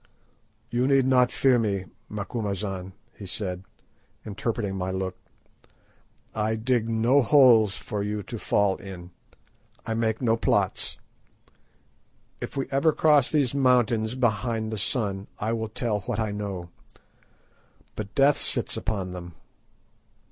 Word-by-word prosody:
"You 120 +2 +1
need 135 -2 +4
not 125 -2 +4
fear 130 -3 +3
me, 100 -4 -1 0.2
Macumazahn," 100 -3 -4 0.2
he 100 - -9
said, 90 -1 -3 0.6
interpreting 105 -1 -3
my 95 -1 -2
look. 95 0 -3 1.2
"I 110 0 0
dig 115 0 0
no 115 +5 +3
holes 120 -6 +5
for 105 - -4
you 105 0 -3
to 115 - -7
fall 100 -2 +2
in. 90 -2 -10 0.7
I 115 - -2
make 110 -1 0
no 115 -3 +2
plots. - - 0 1.4
If - - -6 0.2
ever 140 +4 +4
we 155 - 0
cross 150 -4 +4
those 140 -5 +2
mountains 125 -4 +2
behind 115 -2 0
the 110 - -3
sun 100 -3 -1
I 110 +2 -1
will 110 -1 -3
tell 110 -1 -1
what 105 +3 -4
I 110 -2 -1
know. 100 -4 -5 1.2
But 105 -1 -6
Death 140 +1 +5
sits - - +1
upon 100 -4 -3
them. 90 -2 -8
110 Hz, 130 wpm, -26 LUFS, 100-125 Hz, 1.4 s, holes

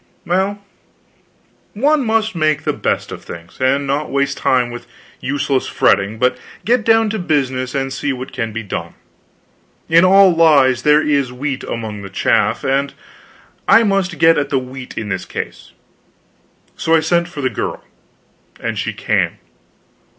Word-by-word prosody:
Well, 195 +3 -1 1.1
one 285 +6 +2
must 220 -1 0
make 155 -3 +1
the - - 0
best - - -2
of - - -8
things, 85 0 -11
and 135 +2 +2
not 140 +2 -1
waste 140 0 -1
time 125 -2 +1
with 120 - -9 0.3
useless 140 -1 -1
fretting, 100 +3 +1
but 125 +2 +1 0.3
get 235 0 +2
down 225 -1 +3
to 220 - -3
business 130 -6 -1
and 135 -1 -2
see 145 - -2
what 130 0 -6
can 115 -1 -3
be 115 +1 -5
done. 100 - -6 0.9
In 165 +2 +5
all 190 0 +6
lies 140 -7 +4
there 150 +3 +4
is 140 -4 +1
wheat 135 +2 -4
among 110 -3 -5
the 95 - -8
chaff; 95 - +1 1.0
I 230 - +6
must 195 -3 0
get 165 -2 +5
at 140 -1 -2
the 135 - +1
wheat 130 0 -7
in 110 -2 -4
this 95 -2 -3
case: - - -7 1.0
so 165 - +1
I - - +5
sent 170 +2 +1
for 150 -5 -7
the 130 -1 0
girl - - -4 0.8
and - - -3
she - - -2
came. - - -1
140 Hz, 160 wpm, -17 LUFS, 130-175 Hz, 1.1 s, all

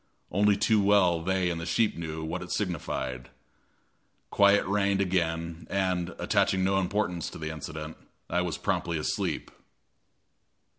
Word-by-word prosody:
Only 100 +1 +3
too 105 +1 +3
well 100 -4 +4
they 95 0 +1
and 85 -1 -4
the - - -4
sheep 110 +4 +2
knew 80 -1 -5
what 80 - -3
it - - -7
signified. 65 -1 -3 1.0
Quiet 100 0 +5
reigned 100 0 +1
again, 85 -3 -1
and, 95 -3 -1
attaching 95 -1 +2
no 95 +1 +2
importance 90 -3 -1
to - - -9
the 80 0 -4
incident, 80 0 -7 0.3
I 90 +2 0
was 90 -3 -2
promptly 85 -1 -1
asleep. 75 - -2
90 Hz, 140 wpm, -28 LUFS, 80-100 Hz, 1.0 s, Quiet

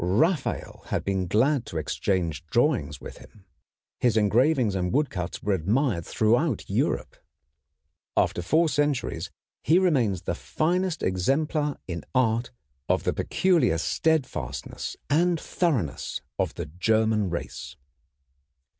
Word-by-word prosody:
Raphael 135 - 0
had - - -1
been 95 -2 0
glad 125 - +2
to 85 - -5
exchange 85 -1 -1
drawings 100 - +1
with - - -10
him. 100 -3 -17 0.5
His 120 -3 +2
engravings 120 +2 +3
and 90 -2 -1
woodcuts 105 - -1
were 105 - +1
admired 100 - 0
throughout 120 - +1
Europe. - - -1 1.0
After - - +2
four 160 - +3
centuries 145 - -1 0.3
he 165 - +4
remains 125 - +2
the 85 - -1
finest 175 - -1
exemplar 145 - 0
in 85 -3 -4
art 115 -2 +2 0.4
of - - +2
the - - 0
peculiar 175 - +2
steadfastness 160 - -1
and 170 +3 +2
thoroughness 135 - -1 0.2
of - - 0
the - - -4
German 105 +5 +1
race. 85 - -5
115 Hz, 120 wpm, -26 LUFS, 90-150 Hz, 1.0 s, he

